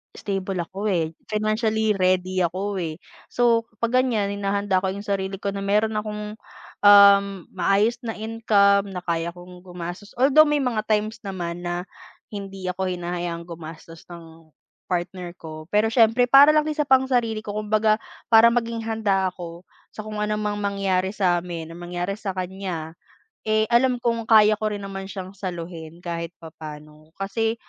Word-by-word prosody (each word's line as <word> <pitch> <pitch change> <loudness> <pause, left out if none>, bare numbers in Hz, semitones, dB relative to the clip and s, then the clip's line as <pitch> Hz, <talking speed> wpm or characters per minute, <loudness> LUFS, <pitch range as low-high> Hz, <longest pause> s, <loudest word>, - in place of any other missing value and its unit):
stable 195 -1 -3
ako 195 +5 -5
eh, 165 -5 0 0.2
financially 215 +1 0
ready 185 0 +1
ako 190 +3 -2
eh. 160 -2 -3 0.4
So 235 -1 +2 0.2
'pag 240 +2 +3
ganiyan, 210 -6 0
hinahanda 200 -1 +1
ko 190 - +1
yung 200 +2 -6
sarili 195 -1 -2
ko 200 - -2
na 200 - -5
meron 210 +2 +2
akong, 210 0 -4 0.5
ah, 200 -1 +9 0.3
maayos 195 +5 +1
na 225 -1 -4
income 205 -3 +2
na 180 - -5
kaya 170 0 -1
kong 180 0 -12
gumastos. 180 +2 -8
Although, 285 +5 +6
may 295 0 +2
mga 230 -4 -1
times 215 0 0
naman 175 -3 -5
na 175 0 -2 0.5
hindi 195 -2 -7
ako 190 +1 -3
hinahayaan 175 -1 -4
gumastos 165 -1 -10
ng 165 -1 -13 0.4
partner 180 0 -3
ko. 155 -2 -9
Pero 215 +2 +3
siyempre, 230 +1 +4
para 285 +3 +8
lang 305 - +5
yun 305 - -4
sa 300 - +1
pang-sarili 255 -5 +2
ko 210 -1 -6
kumbaga 215 0 +2 0.3
para 230 +1 +7
maging 230 -1 -2
handa 205 -4 +1
ako 175 0 -9 0.2
sa 215 - -9
kung 215 -1 -5
ano 210 0 0
mang 210 -1 -2
mangyari 195 -2 0
sa 180 -4 +1
amin, 165 -2 -7
ang 175 - -11
mangyari 175 +2 -3
sa 195 -2 -5
kanya, 180 -3 -4 0.5
eh, 215 0 +3
alam 245 0 +3
kung 230 -2 0
kaya 215 -1 +6
ko 215 - -2
rin 205 - -6
naman 195 -1 -6
siyang 190 -1 -7
saluhin 170 -2 -7
kahit 170 -1 -5
papaano. 155 0 -11
Kasi, 225 +3 -1
200 Hz, 165 wpm, -23 LUFS, 175-215 Hz, 0.5 s, ah